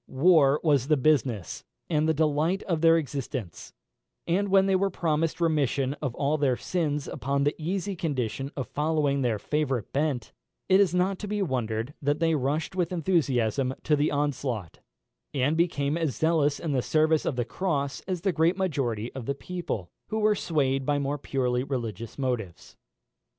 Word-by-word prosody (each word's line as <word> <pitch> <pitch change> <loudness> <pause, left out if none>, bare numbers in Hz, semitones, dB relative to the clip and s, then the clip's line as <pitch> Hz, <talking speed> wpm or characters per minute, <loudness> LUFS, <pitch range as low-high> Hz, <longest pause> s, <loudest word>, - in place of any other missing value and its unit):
War 145 -1 +4
was 140 -5 +3
the 155 -1 +3
business 125 - +1 0.2
and 155 -1 +1
the - - +4
delight 155 +5 +1
of 165 -4 -1
their 165 0 +6
existence; 135 - -5 0.5
and 195 +4 +1
when 195 0 +5
they 195 -1 +2
were 195 +1 +2
promised 165 -2 -1
remission 145 -5 +1
of 135 -5 -3
all 145 +2 0
their 130 -4 +2
sins 150 -5 -2
upon 140 +1 -1
the 145 - +2
easy 190 +4 -2
condition 135 - -2
of 135 - -4
following 150 -2 0
their 120 -4 +1
favourite 135 -1 -2
bent, 140 -4 -1 0.3
it 190 +1 +5
is 185 -3 +3
not 185 +1 +1
to 210 - -5
be 205 0 -1
wondered 115 - -2
at 145 - -16
that 145 +1 0
they 165 -1 +2
rushed 150 +5 -1
with 180 -2 0
enthusiasm 135 - +1
to 150 - +3
the 145 +1 +1
onslaught, 135 - -2 0.6
and 140 +3 +2
became 155 -4 +1
as 155 -8 -1
zealous 155 -1 +2
in 165 - -3
the 130 -3 +1
service 155 +3 +2
of - - -1
the 120 -1 -1
cross 140 -4 -2
as 185 -3 -2
the 195 +1 +1
great 165 +3 +2
majority 130 - -1
of 130 -4 -7
the 140 - -1
people, 140 - -5 0.2
who 220 - -3
were 215 0 +3
swayed 135 -8 0
by 145 +2 +1
more 145 +1 -2
purely 125 -3 -1
religious 115 -5 -4
motives. 125 -10 -4
145 Hz, 175 wpm, -27 LUFS, 130-165 Hz, 0.6 s, their